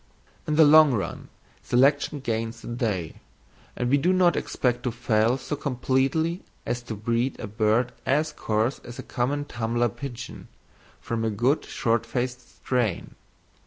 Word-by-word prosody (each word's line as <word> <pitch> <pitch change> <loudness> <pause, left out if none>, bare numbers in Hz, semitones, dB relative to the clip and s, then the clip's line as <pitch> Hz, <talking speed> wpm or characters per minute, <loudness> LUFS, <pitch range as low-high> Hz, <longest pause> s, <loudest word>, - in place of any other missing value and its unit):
In 150 - +1
the 160 0 +7
long 150 -2 +7
run 100 - -4 0.3
selection 140 +3 +2
gains 115 -2 -3
the - - -8
day, 105 -9 -2 0.6
and 125 - -1
we 140 +3 +3
do 175 +6 +2
not 180 -2 +4
expect 120 -1 -1
to 125 - -1
fail 115 0 +1
so 140 +3 -4
completely 140 +5 0 0.2
as 120 - -2
to 120 -2 -6
breed 115 +4 -1
a - - -4
bird 110 +3 +1
as 150 +3 +1
coarse 110 0 -1
as 120 - -11
a - - -6
common 145 +4 -1
tumbler 120 -2 0
pigeon 125 +2 -8 0.5
from 115 -1 -3
a 110 - +1
good 120 +8 +1
short 115 -3 0
faced 125 +1 -4
strain. 120 -8 -1
125 Hz, 155 wpm, -25 LUFS, 115-140 Hz, 0.6 s, the